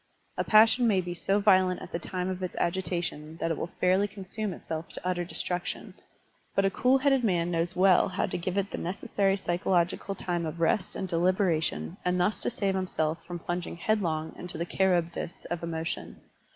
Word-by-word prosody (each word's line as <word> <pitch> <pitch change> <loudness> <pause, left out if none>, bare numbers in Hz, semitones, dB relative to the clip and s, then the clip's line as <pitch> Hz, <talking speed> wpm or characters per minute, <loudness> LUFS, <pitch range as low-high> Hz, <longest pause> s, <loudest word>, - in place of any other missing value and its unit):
A - - 0
passion 225 +3 +6
may 200 -4 +3
be 175 -1 -3
so 195 +3 +1
violent 185 -3 +4
at - - -9
the 170 - -2
time 180 +1 -3
of 185 0 -3
its 185 - -4
agitation 170 -3 -2
that 165 - -1
it 165 - -1
will 170 - -3
fairly 185 +3 +3
consvime 200 +1 -5
itself 160 -2 -6
to 180 - -5
utter 180 -1 0
destruc 175 0 -2
tion, - - -6 0.6
but 195 - +3
a 195 - +2
cool 255 +6 +3
headed 270 -1 +3
man 175 -5 +1
knows 170 +1 0
well 185 0 +5
how 185 +1 0
to - - -4
give 185 +2 -3
it 200 0 0
the - - -4
necessary 195 +2 0
psychological 180 +1 0
time 175 -3 -2
of 155 +2 -6
rest 180 +5 +1
and 190 - -3
deliberation 170 - +1
and 180 0 +1
thus 195 +4 +1
to - - +2
save 200 -5 -1
himself 165 -4 -1
from 175 0 -4
plunging 175 0 -4
headlong 165 -6 0
into 180 -2 -5
the 170 - -2
Charybdis 175 -1 0
of 175 - -2
emotion. 165 0 -4
180 Hz, 195 wpm, -28 LUFS, 170-195 Hz, 0.6 s, passion